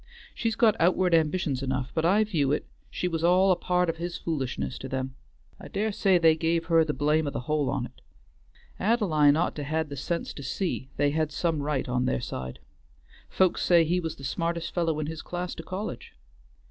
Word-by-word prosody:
She's 225 Hz, -1 st, -1 dB
got 220 Hz, -3 st, +4 dB
outward 180 Hz, +1 st, +3 dB
ambitions 155 Hz, -4 st, +1 dB
enough, 130 Hz, -1 st, -2 dB
but 160 Hz, 0 st, 0 dB
I 200 Hz, +5 st, +4 dB
view 155 Hz, -10 st, 0 dB
it 150 Hz, -, 0 dB, 0.2 s
she 180 Hz, -, -2 dB
was 165 Hz, -2 st, -2 dB
all 185 Hz, +3 st, +5 dB
a -, -, +4 dB
part 180 Hz, 0 st, +1 dB
of 165 Hz, 0 st, -2 dB
his 170 Hz, +1 st, -4 dB
foolishness 135 Hz, -5 st, -3 dB
to 135 Hz, -, -7 dB
them; 130 Hz, 0 st, -3 dB, 0.5 s
I -, -, -9 dB
dare 215 Hz, +2 st, -1 dB
say 195 Hz, -2 st, +3 dB
they 165 Hz, -2 st, +5 dB
give 165 Hz, +1 st, 0 dB
her 165 Hz, -1 st, +4 dB
the 155 Hz, -, -1 dB
blame 150 Hz, +1 st, +2 dB
o' -, -, +1 dB
the 140 Hz, -, -4 dB
whole 150 Hz, +1 st, 0 dB
on't. 125 Hz, -3 st, -4 dB, 0.8 s
Ad'line 165 Hz, -10 st, +3 dB
ought 175 Hz, -, +1 dB
to 145 Hz, -, -3 dB
had 155 Hz, +1 st, -1 dB
the 140 Hz, -, -5 dB
sense 170 Hz, +5 st, -3 dB
to -, -, -9 dB
see 140 Hz, -1 st, -3 dB
they 145 Hz, 0 st, +2 dB
had 155 Hz, 0 st, 0 dB
some 160 Hz, +1 st, -1 dB
right 145 Hz, -2 st, -1 dB
on 125 Hz, 0 st, 0 dB
their 130 Hz, -, 0 dB
side. 65 Hz, -, -6 dB, 0.7 s
Folks 185 Hz, -2 st, +2 dB
say 170 Hz, -2 st, +5 dB
he 175 Hz, +3 st, +1 dB
was 160 Hz, -2 st, -4 dB
the 135 Hz, -, -13 dB
smartest 170 Hz, +5 st, -2 dB
fellow 165 Hz, -3 st, 0 dB
in 155 Hz, -, -1 dB
his 160 Hz, +1 st, -5 dB
class 180 Hz, 0 st, -4 dB
to -, -, -7 dB
college." 190 Hz, +6 st, -6 dB
160 Hz, 210 wpm, -27 LUFS, 145-180 Hz, 0.8 s, all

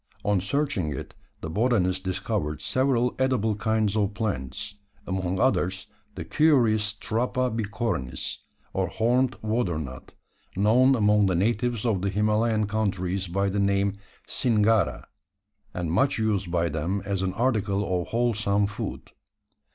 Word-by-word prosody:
On 100 Hz, -2 st, +2 dB
searching 120 Hz, -, -1 dB
it, 70 Hz, -, -6 dB, 0.3 s
the 80 Hz, -, -5 dB
botanist 95 Hz, -4 st, +1 dB
discovered 75 Hz, -5 st, -2 dB
several 125 Hz, -, +1 dB
edible 125 Hz, -5 st, +1 dB
kinds 110 Hz, -1 st, 0 dB
of 105 Hz, -1 st, 0 dB
plants; 100 Hz, -, -3 dB, 0.3 s
among 95 Hz, -1 st, -2 dB
others 95 Hz, -8 st, +1 dB, 0.3 s
the -, -, -5 dB
curious 115 Hz, -9 st, +3 dB
Trapa 125 Hz, +3 st, -1 dB
bicornis, 105 Hz, -, -2 dB, 0.4 s
or 95 Hz, -1 st, 0 dB
horned 125 Hz, +6 st, +1 dB
water 110 Hz, -6 st, 0 dB
nut 65 Hz, -4 st, -8 dB, 0.4 s
known 120 Hz, +7 st, +4 dB
among 105 Hz, -3 st, +4 dB
the 90 Hz, -, +1 dB
natives 115 Hz, +4 st, 0 dB
of 105 Hz, -6 st, +1 dB
the 100 Hz, -, 0 dB
Himalayan 105 Hz, +2 st, +1 dB
countries 95 Hz, -3 st, -1 dB
by 100 Hz, +3 st, 0 dB
the 100 Hz, +1 st, -1 dB
name 100 Hz, 0 st, +1 dB, 0.3 s
Singara, 110 Hz, -3 st, +2 dB, 0.7 s
and 85 Hz, -3 st, -3 dB
much 135 Hz, +11 st, +2 dB
used 105 Hz, -4 st, 0 dB
by 85 Hz, -1 st, +1 dB
them 85 Hz, +6 st, -2 dB
as 100 Hz, -2 st, -1 dB
an 95 Hz, -1 st, -1 dB
article 100 Hz, -6 st, 0 dB
of -, -, -7 dB
wholesome 105 Hz, -4 st, +1 dB
food. 105 Hz, +1 st, -6 dB
105 Hz, 135 wpm, -26 LUFS, 95-115 Hz, 0.7 s, known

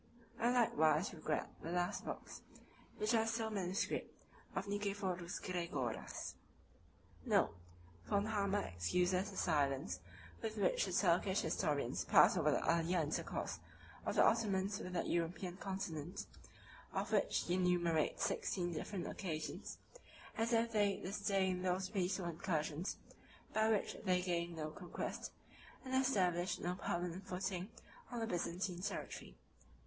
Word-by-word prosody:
I 235 Hz, -, +3 dB
likewise 175 Hz, -8 st, +3 dB
regret 155 Hz, -2 st, -1 dB
the 165 Hz, -, -4 dB
last 180 Hz, +2 st, 0 dB
books, -, -, -6 dB, 0.6 s
which 215 Hz, +2 st, +1 dB
are 225 Hz, -1 st, +4 dB
still 225 Hz, -1 st, 0 dB
manuscript, 190 Hz, -2 st, -1 dB, 0.4 s
of -, -, -1 dB
Nicephorus 200 Hz, -3 st, -2 dB
Gregoras. 170 Hz, -10 st, -3 dB, 0.5 s
* -, -, -27 dB
Note: -, -, +3 dB, 0.5 s
Von 200 Hz, 0 st, +2 dB
Hammer 205 Hz, -2 st, +1 dB
excuses 180 Hz, -, +1 dB
the 195 Hz, -, -9 dB
silence 140 Hz, -, +1 dB, 0.4 s
with 220 Hz, -1 st, -3 dB
which -, -, +3 dB
the -, -, -3 dB
Turkish -, -, +3 dB
historians -, -, 0 dB
pass -, -, +7 dB
over -, -, +3 dB
the -, -, +1 dB
earlier 170 Hz, +2 st, +3 dB
intercourse 155 Hz, -2 st, -1 dB, 0.4 s
of -, -, -1 dB
the -, -, +7 dB
Ottomans 200 Hz, -3 st, +2 dB
with 180 Hz, -, -5 dB
the 175 Hz, -, 0 dB
European 175 Hz, +2 st, -1 dB
continent, 185 Hz, -5 st, -4 dB, 0.7 s
of -, -, -1 dB
which -, -, +2 dB
he 175 Hz, -, -1 dB
enumerates 175 Hz, -3 st, +2 dB
sixteen 175 Hz, -2 st, -1 dB
different 175 Hz, +3 st, -3 dB
occasions, 160 Hz, -6 st, -4 dB, 0.6 s
as 225 Hz, +1 st, +1 dB
if 230 Hz, 0 st, +3 dB
they 205 Hz, -3 st, +3 dB
disdained 190 Hz, -2 st, 0 dB
those 185 Hz, +1 st, +1 dB
peaceful 190 Hz, -2 st, 0 dB
incursions 165 Hz, 0 st, -1 dB, 0.6 s
by 220 Hz, 0 st, +4 dB
which 215 Hz, -3 st, +1 dB
they 180 Hz, -3 st, +3 dB
gained 170 Hz, -1 st, -1 dB
no 155 Hz, -1 st, -3 dB
conquest, 175 Hz, +2 st, -5 dB, 0.5 s
and 260 Hz, -, -4 dB
established 185 Hz, -9 st, +2 dB
no 175 Hz, -, -1 dB
permanent 180 Hz, +1 st, -3 dB
footing 185 Hz, +1 st, -2 dB, 0.4 s
on 240 Hz, -, -3 dB
the 225 Hz, -, 0 dB
Byzantine 180 Hz, -1 st, -2 dB
territory. 200 Hz, -, -4 dB
185 Hz, 135 wpm, -38 LUFS, 170-205 Hz, 0.7 s, pass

